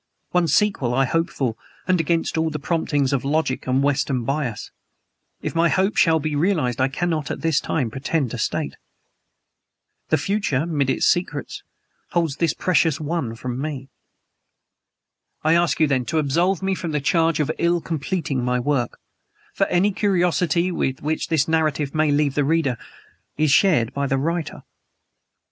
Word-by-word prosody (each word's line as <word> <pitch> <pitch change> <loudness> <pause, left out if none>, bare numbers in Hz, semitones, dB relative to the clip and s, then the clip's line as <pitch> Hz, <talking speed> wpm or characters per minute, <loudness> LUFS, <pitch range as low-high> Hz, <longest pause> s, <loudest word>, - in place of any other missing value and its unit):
One 180 -1 +2
sequel 145 - +1
I 135 +1 +3
hope 165 +6 0
for, 125 -8 -2 0.3
and 185 -2 +3
against 165 +1 0
all 160 0 +1
the 150 - -4
promptings 145 -3 0
of 135 - 0
logic 140 -2 -1
and 130 +2 +2
Western 140 -3 0
bias. 135 -3 -3 0.7
If - - -3
my 165 0 +3
hope 190 +4 +1
shall 160 -3 +4
be 155 0 -2
realized 145 -7 +1
I 130 - +4
cannot, 155 +1 -2
at - - -4
this 160 -4 +2
time, 130 -8 -2
pretend 135 0 -1
to - - -5
state. - - -2 1.3
The 155 - +3
future, 165 -5 0
'mid 145 -5 0
its - - +1
many 175 - 0
secrets, - - -7 0.5
holds 165 -5 0
this 165 -3 +1
precious 165 -4 +2
one 150 -7 -3
from 125 +2 -5
me. 140 -3 -5 1.5
I 155 +1 +4
ask 170 0 +2
you 160 - +5
then, 130 -4 0
to 160 - -2
absolve 170 +6 +1
me 190 0 +1
from 170 -4 -4
the 150 - +1
charge 165 +3 +2
of 150 0 +1
ill 170 0 +2
completing 160 -4 -2
my 125 0 +1
work; 125 -2 -1 0.6
for - - +1
any 190 +4 +2
curiosity 180 -3 +1
with 135 -6 -2
which 155 +2 -1
this 155 -3 +1
narrative 155 -3 0
may 155 -1 +2
leave 145 -1 +2
the 145 - +1
reader 155 -1 +2
burdened - - -23
is 150 - +2
shared 145 - +3
by 140 0 -1
the 135 - +1
writer. 165 +3 -3
155 Hz, 170 wpm, -22 LUFS, 135-170 Hz, 1.5 s, you